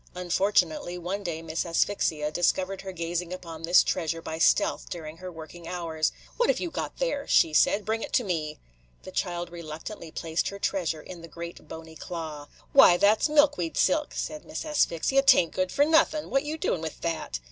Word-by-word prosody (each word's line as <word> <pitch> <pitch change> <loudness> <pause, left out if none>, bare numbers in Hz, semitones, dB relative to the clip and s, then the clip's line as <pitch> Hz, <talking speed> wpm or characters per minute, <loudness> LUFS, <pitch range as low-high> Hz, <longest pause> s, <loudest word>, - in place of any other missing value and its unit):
Unfortunately, 180 - +1
one 180 +4 -3
day 165 -4 -4
Miss 160 0 -2
Asphyxia 165 -3 0
discovered 185 +3 0
her 195 - -6
gazing 170 0 -3
upon 165 -3 -7
this 170 +2 +5
treasure 165 -2 -1
by 160 -1 -6
stealth - - +2
during 160 -2 -7
her 185 +1 -8
working 165 +1 -10
hours. 165 -3 -1 0.3
"What 480 - +2
have - - +2
you 345 - -3
got - - -4
there?" 395 - -2
she 160 - +4
said. 200 +6 +3
"Bring 220 +1 -1
it - - -5
to 250 - +3
me." 155 -6 -3 0.5
The 185 - -9
child 175 -2 -3
reluctantly 165 +2 -8
placed 160 +1 -2
her 200 - -5
treasure 175 -6 -1
in 175 -2 -10
the 170 - -9
great 170 -1 -9
bony 160 0 -10
claw. 155 -4 -6 0.3
"Why, 270 -11 +8
that 205 +4 +4
's - - +2
milkweed 290 - +3
silk," 300 -1 +2
said 305 0 -4
Miss 305 - -6
Asphyxia. 275 - +2
"'T 275 -1 +7
ain't 170 - +1
good 185 -1 -1
for 285 - +3
nothin' 315 -1 +2
.What 275 +2 +1
you 305 +2 -3
doing 185 - -1
with 160 -1 -6
that?" 165 - -2
175 Hz, 195 wpm, -27 LUFS, 165-205 Hz, 0.5 s, Why